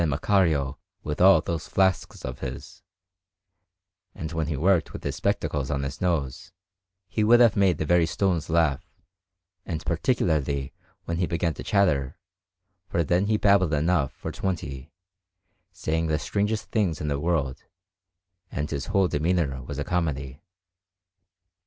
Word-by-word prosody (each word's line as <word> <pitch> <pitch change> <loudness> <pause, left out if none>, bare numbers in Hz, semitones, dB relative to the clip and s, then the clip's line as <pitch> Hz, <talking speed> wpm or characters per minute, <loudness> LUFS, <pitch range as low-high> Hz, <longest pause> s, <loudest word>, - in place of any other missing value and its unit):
Macario 75 -2 +1 0.3
with 75 +2 -3
all 95 -3 +7
those 80 0 -4
flasks 95 -3 0
of 65 0 -6
his; 65 -2 -7 1.3
and 80 0 -5
when 80 -2 -2
he 75 -3 -2
worked 85 +1 +2
with - - -8
his - - -3
spectacles 70 -3 -1
on 70 -2 -1
his 70 +1 -5
nose, 85 -2 -1 0.6
he 105 +4 -1
would 120 +3 +6
have 120 -4 +5
made 95 -5 +3
the 80 - -2
very 85 0 +3
stones 90 -2 0
laugh, 80 -4 +2 0.8
and 85 -4 -5
particularly 75 - 0 0.3
when 85 - -2
he 90 0 0
began 85 -1 -1
to - - -9
chatter, 80 - +1 0.7
for 85 - +1
then 90 +5 +1
he 110 0 +2
babbled 100 -6 +3
enough 80 -2 +1
for - - -6
twenty, 75 -6 -4 0.8
saying 80 -3 -1
the 80 -1 +1
strangest 105 +8 -2
things 95 -9 0
in 75 - -3
the 70 -1 -1
world, 75 -5 -1 0.9
and 75 0 -3
his 70 -3 -3
whole 100 -2 +2
demeanour 75 -4 0
was 70 +2 -7
a 70 - -1
comedy. 70 -6 -2
80 Hz, 145 wpm, -26 LUFS, 70-90 Hz, 1.3 s, all